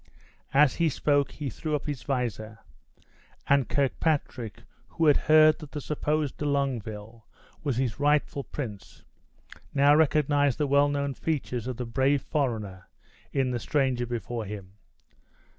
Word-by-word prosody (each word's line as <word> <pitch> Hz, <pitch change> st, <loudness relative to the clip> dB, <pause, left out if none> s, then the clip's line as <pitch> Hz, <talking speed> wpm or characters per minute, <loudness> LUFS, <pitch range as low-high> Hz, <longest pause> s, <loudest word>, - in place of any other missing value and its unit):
As 140 Hz, -1 st, +4 dB
he 170 Hz, -1 st, +3 dB
spoke 145 Hz, 0 st, +1 dB
he 145 Hz, -4 st, -5 dB
threw 155 Hz, +5 st, -3 dB
up 145 Hz, -, -4 dB
his 145 Hz, -5 st, -4 dB
visor; 115 Hz, -4 st, -3 dB, 0.9 s
and 140 Hz, -4 st, +2 dB
Kirkpatrick, 135 Hz, -5 st, -1 dB, 0.2 s
who 165 Hz, -, -1 dB
had 145 Hz, -2 st, +6 dB
heard 155 Hz, 0 st, +5 dB
that 150 Hz, -3 st, -11 dB
the 150 Hz, -, -3 dB
supposed 150 Hz, 0 st, -2 dB
De 150 Hz, -, -4 dB
Longueville 115 Hz, -6 st, -3 dB, 0.4 s
was 140 Hz, -6 st, -1 dB
his 130 Hz, -2 st, -1 dB
rightful 145 Hz, -1 st, +1 dB
prince, 110 Hz, -10 st, -8 dB, 0.7 s
now 140 Hz, +1 st, +6 dB
recognized 145 Hz, -3 st, +3 dB
the 150 Hz, -, +1 dB
well 140 Hz, +1 st, +3 dB
known 140 Hz, -1 st, -1 dB
features 130 Hz, -6 st, -3 dB
of 130 Hz, -2 st, -4 dB
the 125 Hz, -, -3 dB
brave 135 Hz, +4 st, +1 dB
foreigner 110 Hz, -, -3 dB, 0.4 s
in 135 Hz, -2 st, 0 dB
the 120 Hz, -, -2 dB
stranger 130 Hz, -1 st, 0 dB
before 120 Hz, -1 st, -4 dB
him. 100 Hz, -2 st, -8 dB
140 Hz, 140 wpm, -27 LUFS, 120-145 Hz, 0.9 s, had